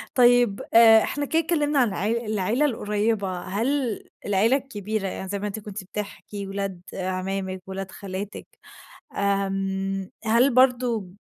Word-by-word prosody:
طيب 245 -4 +4
آآ، 225 -1 +8
إحنا 290 0 -2
كدا 320 +3 +1
اتكلّمنا 300 -3 +1
عن 250 - +4
العي 220 +5 -1
العيلة 215 +6 +1
القريّبة، 210 -6 -1
هل 230 +4 -1 0.2
العيلة 210 +6 +3
الكبيرة 215 -6 -4
يعني 190 0 -5
زي 200 0 -2
ما 205 - -3
أنتِ 210 +1 -5
كنت 205 -1 -7
بتحكي، 205 +1 -6
ولاد 195 -2 -4
عمامِك، 185 0 -3
ولاد 190 0 -5
خالاتِك 195 +1 -6 0.7
آمم، 195 -1 -1 0.2
هل 235 +4 +4
برضه 250 -5 +3
205 Hz, 135 wpm, -25 LUFS, 195-240 Hz, 0.7 s, آآ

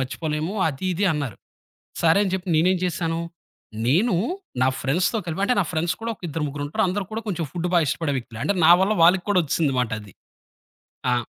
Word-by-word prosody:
మర్చిపోలేము," 155 +6 -3 0.2
అది 145 +4 -6
ఇది 195 +4 0
అన్నారు. 140 -9 -3 0.7
సరే 165 +4 +4
అని 195 - -1
జెప్పి 185 -1 -3
నేనేం 180 +4 +3
చేశాను, 165 -1 -1 0.7
నేను 180 - +3 0.5
నా 130 - +4
ఫ్రెండ్స్‌తో 175 - +1
కలిపి 170 +3 -3
అంటే, 250 - +2
నా - - -1
ఫ్రెండ్స్ 165 +1 0
కూడా 230 0 -2
ఒక - - -36
ఇద్దరు 150 +1 -3
ముగ్గురుంటారు. 145 +1 -2
అందరూ 190 +1 -2
కూడా 225 +1 -3
కొంచెం 170 -5 -2
ఫుడ్డు 175 0 -2
బాగిష్టపడే 155 -2 +1
వ్యక్తులే. 120 -2 -8
అంటే 200 - +1
నా 170 - +8
వల్ల 205 +3 +2
వాళ్ళకి 180 +2 +5
కూడా 195 - +4
వచ్చేసిందిమాటది. 125 - -1 1.0
ఆ! - - +3
165 Hz, 175 wpm, -23 LUFS, 145-185 Hz, 1.0 s, నా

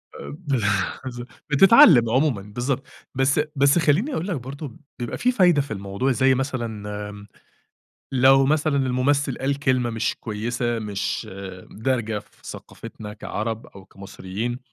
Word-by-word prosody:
أب 70 +1 -9 0.6
بالضبط، 120 -2 -7 0.2
بتتعلَّم 150 - +7
عمومًا، 130 -3 +1
بالضبط، 120 +6 -3 0.3
بس 135 +2 +2
أ 150 - +2
بس 140 +3 +4
خلِّيني 170 - +2
أقول 170 -3 -2
لك 190 - -1
برضه، 135 0 -7 0.2
بيبقى 120 -1 -4
في 250 - +2
فايدة 180 - +4
في 140 - -8
الموضوع، 100 +6 -2
زي 130 +2 +3
مثلًا 120 -6 -4 0.2
آمم، 105 0 -11 0.9
لو 135 +1 +5
مثلًا 155 0 +1
الممثل 135 +2 +1
قال 135 +1 -1
كلمة 130 -4 +1
مش 115 0 -1
كويِسة، 115 +2 -2
مش 100 -2 -3 0.4
دارجة 115 -2 -1
في 105 - -17
ثقافتنا 105 -1 -9
كعرب 110 +1 -4
أو 100 -1 -14
كمصريين، 100 +5 -6
125 Hz, 140 wpm, -23 LUFS, 110-140 Hz, 0.9 s, بتتعلَّم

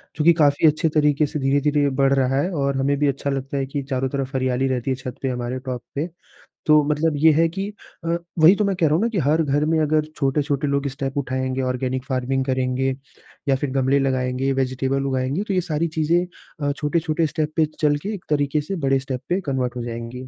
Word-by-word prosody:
चूँकि 165 +2 +5
काफ़ी 150 0 +4
अच्छे 155 +2 +2
तरीके 150 -1 +2
से 150 +1 -4
धीरे-धीरे 145 +1 +2
बढ़ 135 0 +4
रहा 135 0 +2
है 180 - -1
और 140 -4 0
हमें 140 +1 +1
भी 145 - +3
अच्छा 140 +1 -1
लगता 135 0 -3
है 135 - 0
कि 140 +1 -4
चारों 130 -1 0
तरफ 135 0 -3
हरियाली 130 0 +1
रहती 130 0 -1
है - - +1
छत 130 -1 -7
पे 135 - -1
हमारे 125 +1 -3
टॉप 125 -2 -4
पे। 150 +5 -1 0.6
तो 150 0 +7
मतलब 150 +2 +1
ये 160 +2 +6
है 165 +2 +4
कि 195 +4 -4 0.4
अ, 170 +1 +1 0.2
वही 165 +5 +8
तो 210 - 0
मैं 200 -1 0
कह 175 -3 +1
रहा 150 - +2
हूँ 175 - +1
ना, - - +3
कि 215 - -3
हर 155 +2 +2
घर 145 +1 +1
में 160 0 +2
अगर 155 0 +2
छोटे-छोटे 140 0 0
लोग 140 0 0
स्टेप 135 0 -4
उठाएँगे 130 -1 -1
ऑर्गेनिक 130 0 -2
फार्मिंग 130 0 -1
करेंगे 130 0 0 0.5
या 135 - +4
फिर 135 +1 -2
गमले 135 +1 +2
लगाएँगे 130 0 0
वेज़िटेबल 135 +1 -1
उगाएँगे 135 +7 -1
तो 195 - -1
ये 180 - +2
सारी 165 0 -1
चीज़ें 170 +3 +2 0.4
अ, - - +2
छोटे-छोटे 155 +2 0
स्टेप 155 0 -2
पे 160 - +4
चलके 150 +7 +1
एक 195 - -8
तरीके 145 0 +1
से 195 +7 -4
बड़े 135 0 +3
स्टेप 130 -1 -5
पे 180 - +1
कन्वर्ट 130 -5 -2
हो 120 - -4
जाएँगी। 120 +2 -6
140 Hz, 220 wpm, -22 LUFS, 130-155 Hz, 0.6 s, वही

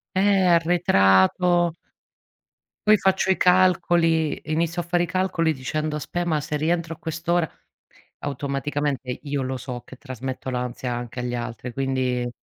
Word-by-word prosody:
Eh, 195 -1 +3
arretrato 170 - +4 1.1
poi 215 - +7
faccio 190 0 +1
i - - +1
calcoli 175 -3 +3
inizio 170 +2 0
a - - -9
fare 175 0 +1
i - - +1
calcoli 170 -2 0
dicendo: 150 +3 -3
"Aspe 175 +3 -3
ma 155 -3 0
se 150 +1 -3
rientro 165 +1 -1
a - - -25
quest'ora" 165 0 -1 0.8
automaticamente 140 -1 -2
io 140 -2 -3
lo 130 0 -3
so 125 -1 -6
che 130 - -12
trasmetto 130 0 -6
l'ansia 125 0 -3
anche 120 0 -5
agli 125 0 -3
altri 120 +1 -5
quindi 130 -1 -1
150 Hz, 140 wpm, -24 LUFS, 130-175 Hz, 1.1 s, poi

